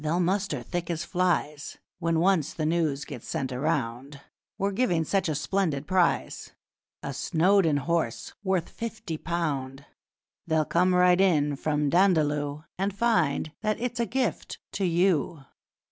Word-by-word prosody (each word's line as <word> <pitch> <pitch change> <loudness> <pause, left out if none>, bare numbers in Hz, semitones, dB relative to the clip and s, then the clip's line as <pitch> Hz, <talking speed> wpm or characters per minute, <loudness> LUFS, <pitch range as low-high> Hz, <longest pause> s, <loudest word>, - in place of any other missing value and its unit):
They'll 160 +3 0
muster 180 -6 0
thick 175 -1 -4
as 170 -1 -2
flies 170 -5 -1 0.2
When 165 -2 +1
once 175 -4 +2
the 155 - -2
news 155 -3 0
gets 135 -7 -9
sent 130 - -2
around 135 0 -2 0.4
We're 200 +1 0
giving 190 -6 +1
such 190 +1 0
a 155 - -1
splendid 150 -2 -1
prize 180 0 0 0.5
A 140 - -4
Snowdon 165 +3 +2
horse 165 -5 -2
worth 190 -4 0
fifty 225 -7 -6
pound! 140 -5 -3 0.6
They'll 160 -1 +2
come 180 +3 +2
right 180 0 +5
in 150 -6 +3
from 150 0 0
Dandaloo, 150 -5 +2 0.2
And 195 +1 -1
find 175 -10 +1
that 215 -1 -1
it's 245 0 -3
a 235 - +1
gift 255 -2 -2
to 195 - -1
you!' 170 -3 +1
165 Hz, 145 wpm, -27 LUFS, 150-190 Hz, 0.6 s, right